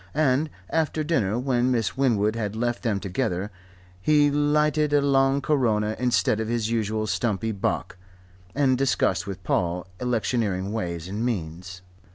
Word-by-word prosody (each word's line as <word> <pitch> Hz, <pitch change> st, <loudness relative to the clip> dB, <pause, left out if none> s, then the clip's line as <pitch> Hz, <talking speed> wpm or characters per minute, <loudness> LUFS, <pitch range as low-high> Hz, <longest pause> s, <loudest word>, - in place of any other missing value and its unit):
And 150 Hz, 0 st, +2 dB, 0.2 s
after 160 Hz, -1 st, 0 dB
dinner, 115 Hz, -, 0 dB
when 125 Hz, -1 st, +1 dB
Miss 120 Hz, -3 st, 0 dB
Winwood 115 Hz, -5 st, +2 dB
had 105 Hz, -2 st, -3 dB
left 120 Hz, +1 st, -1 dB
them 110 Hz, -5 st, 0 dB
together, 100 Hz, 0 st, -2 dB, 0.5 s
he 145 Hz, +3 st, +4 dB
lighted 150 Hz, +1 st, +2 dB
a 145 Hz, -, +5 dB
long 135 Hz, 0 st, +3 dB
Corona 110 Hz, -8 st, +1 dB
instead 120 Hz, -3 st, +2 dB
of 110 Hz, -, -2 dB
his 115 Hz, -1 st, -1 dB
usual 110 Hz, -1 st, 0 dB
stumpy 110 Hz, 0 st, -1 dB
Bock, 95 Hz, -2 st, -2 dB, 0.6 s
and 130 Hz, -3 st, +2 dB
discussed 100 Hz, -8 st, +1 dB
with 95 Hz, -2 st, -6 dB
Paul 90 Hz, -1 st, 0 dB
electioneering 110 Hz, -5 st, -1 dB
ways 85 Hz, -6 st, -3 dB
and 105 Hz, +4 st, -3 dB
means. 90 Hz, -4 st, -4 dB
115 Hz, 145 wpm, -25 LUFS, 100-135 Hz, 0.6 s, a